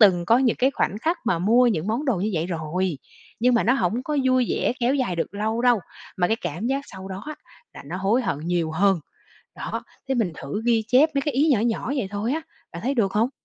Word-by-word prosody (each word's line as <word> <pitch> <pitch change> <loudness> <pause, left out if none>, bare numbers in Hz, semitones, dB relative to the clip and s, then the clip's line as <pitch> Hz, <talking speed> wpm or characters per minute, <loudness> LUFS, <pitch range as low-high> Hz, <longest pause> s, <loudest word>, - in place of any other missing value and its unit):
từng 185 -5 +6
có 230 +5 +5
những 255 -3 +2
cái 265 +2 +3
khoảnh 205 - -1
khắc 325 +9 0
mà 180 -7 +2
mua 230 +8 +4
những 195 -8 0
món 230 +7 -1
đồ 260 -7 +1
như 200 +4 -1
vậy 160 +1 0
rồi, 170 -1 -2 0.4
nhưng 250 +1 +4
mà 235 - +2
nó 240 - +4
hổng 225 +1 0
có 300 +1 -2
vui 255 -1 +3
vẻ - - +1
kéo 245 +3 +2
dài 250 -11 -1
được 170 +4 -3
lâu 220 +3 -1
đâu 245 -4 +4 0.4
mà 180 - +2
cái 225 - +2
cảm 175 +1 -4
giác 270 +2 0
sau 190 0 -8
đó 190 +1 -6
á 305 - -5 0.4
là - - -9
nó 170 +5 -5
hối 200 +7 +1
hận 145 - -1
nhiều 170 0 -1
hơn. 190 +1 +3 0.6
Đó, - - -4 0.2
thế 265 - +1
mình 220 -8 0
thử 145 +11 -5
ghi 230 -2 +2
chép 275 +7 +5
mấy 275 - +1
cái 295 -3 -2
ý 290 +4 +3
nhỏ 255 - +4
nhỏ 235 +3 -1
vậy 230 -8 -1
thôi 205 +4 -2
á, 320 +2 -2 0.3
bạn 170 - -7
thấy 265 +5 0
được 205 -7 +1
hông? 225 +4 +2
220 Hz, 255 wpm, -24 LUFS, 185-250 Hz, 0.6 s, từng